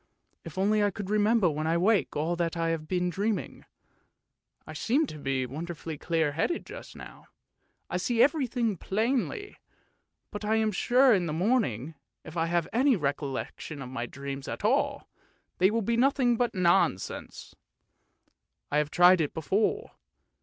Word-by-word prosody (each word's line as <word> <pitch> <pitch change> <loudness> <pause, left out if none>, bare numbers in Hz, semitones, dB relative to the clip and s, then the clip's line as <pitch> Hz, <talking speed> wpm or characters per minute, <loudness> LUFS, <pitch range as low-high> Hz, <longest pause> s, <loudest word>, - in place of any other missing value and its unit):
If - - -10
only 210 +2 +2
I 205 - +3
could 200 +1 -6
remember 210 -1 +3
when 155 0 -1
I 165 +1 +2
wake 200 +4 +2
all 160 +4 0
that 170 0 -1
I 165 0 0
have 160 -2 -3
been 180 0 0
dreaming. 205 +3 -3 1.0
I - - -9
seem 280 +8 +1
to 155 - -9
be 135 -2 -1
wonderfully 160 +4 -6
clear 160 0 0
headed 165 - -1
just - - -10
now; - - -12 0.6
I - - -2
see 230 +5 +2
everything 250 - +1
plainly, 245 - -2 0.7
but 210 0 -6
I 215 +1 +1
am 220 -1 +2
sure 250 +5 +4
in 180 -4 +1
the 155 - -3
morning, 165 - 0 0.3
if 160 - -11
I 165 -1 0
have 170 -1 0
any 260 +2 +4
recollection 140 -1 -4
of 130 -2 -7
my 120 -2 -4
dreams 140 +1 -7
at - - -5
all, - - +1 0.5
they 185 +1 +5
will 225 +1 0
be 230 +3 0
nothing 255 -1 +3
but 240 -1 -1
nonsense. 175 - 0 1.2
I - - +2
have 150 -1 -1
tried 180 +2 +6
it 150 - -2
before. 210 - 0
180 Hz, 160 wpm, -28 LUFS, 155-225 Hz, 1.2 s, tried